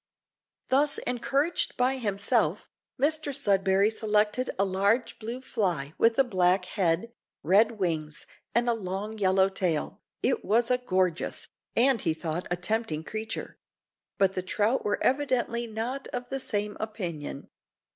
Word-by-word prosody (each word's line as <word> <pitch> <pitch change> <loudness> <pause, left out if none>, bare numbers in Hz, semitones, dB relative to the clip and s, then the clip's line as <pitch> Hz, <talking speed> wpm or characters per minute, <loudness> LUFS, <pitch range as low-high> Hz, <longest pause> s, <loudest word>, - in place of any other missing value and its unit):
Thus 280 +2 +3
encouraged 275 +6 0
by 255 +2 +2
himself, 200 -4 0 0.3
Mr 305 +1 +1
Sudberry 200 -5 +2
selected 215 +3 +1
a 195 - +3
large 200 +6 +1
blue 235 +3 -5
fly 175 - -1
with 230 0 +4
a 270 - +6
black 185 -5 +2
head, 185 +4 0 0.3
red 205 +8 +4
wings, 160 -7 -3 0.3
and 240 +1 +3
a 240 - +4
long 210 +1 -4
yellow 190 -1 +4
tail. 180 -5 -2 0.2
It 455 - +1
was 230 +3 +2
a 250 - +3
gorgeous, 185 -7 -1 0.3
and 245 -1 +4
he 160 -3 0
thought 165 +1 -3
a 175 - +1
tempting 180 -5 -1
creature; 220 +4 -6 0.6
but 195 -1 +3
the 185 - -2
trout 210 +7 0
were 205 - 0
evidently 250 -3 +1
not 235 +5 -4
of 245 0 -5
the 270 - -2
same 210 -4 -2
opinion. 175 -10 -5
215 Hz, 140 wpm, -28 LUFS, 185-245 Hz, 0.6 s, a